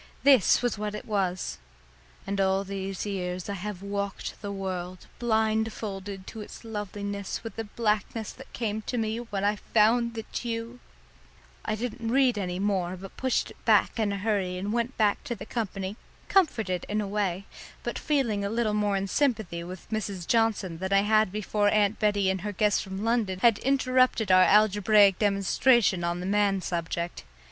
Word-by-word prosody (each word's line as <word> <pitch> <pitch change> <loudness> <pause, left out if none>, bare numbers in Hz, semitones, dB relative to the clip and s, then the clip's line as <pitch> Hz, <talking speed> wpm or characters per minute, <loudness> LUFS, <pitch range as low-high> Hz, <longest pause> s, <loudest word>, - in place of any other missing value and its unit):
This 265 -4 +5
was 240 -4 0
what 210 0 -3
it - - -7
was 190 - -1 0.3
" - - -28
and 195 0 -1
all 190 0 +2
these 195 0 -4
years 180 -3 -3
I 200 - -3
have 200 0 -6
walked 200 0 -4
the 205 -2 -4
world, 185 -2 -5
blindfolded 220 -4 -1
to 220 - -8
its 210 - -10
loveliness 205 -2 -5
with 225 - -7
the 225 - -4
blackness 215 0 -1
that 265 - -13
came 220 -2 -2
to 250 - -2
me 220 0 -1
when 205 -5 -4
I 205 +1 +2
found 230 +3 +2
that 225 +2 -5
you 230 +1 -4 0.4
" - - -28
I 215 - 0
didn't 230 0 -4
read 255 -3 +3
any 180 -2 -3
more, 185 -2 -1
but 195 +1 -10
pushed 260 -1 0
it - - -18
back - - +3
in 210 -2 +1
a 200 - -2
hurry 195 -3 -1
and 200 +3 -3
went 235 +2 -1
back 210 -2 +2
to 240 - -3
the 200 -2 -8
company 200 -3 -4 0.3
comforted 220 - +2
in 210 +1 0
a 210 - -2
way, 195 -2 -1 0.4
but - - -3
feeling 240 -9 0
a 200 - -1
little 225 -1 0
more 205 -1 +1
in 195 0 -2
sympathy 215 -9 0
with 180 +1 -9
Mrs. 200 -5 -3
Johnson 215 -7 +1
than 190 +1 -3
I 195 0 +5
had 215 -2 +3
before 210 0 +1
Aunt 210 0 +2
Bettie 205 -3 +2
and 190 -1 -3
her 210 +2 -3
guest 205 +1 +2
from 190 +1 -6
London 225 -5 +1
had 230 -3 +5
interrupted 255 -5 +2
our 185 0 +7
algebraic 205 0 +5
demonstration 200 0 +3
on 170 +1 -1
the - - -4
man 200 0 +2
subject. 170 - -3
205 Hz, 185 wpm, -27 LUFS, 190-225 Hz, 0.4 s, our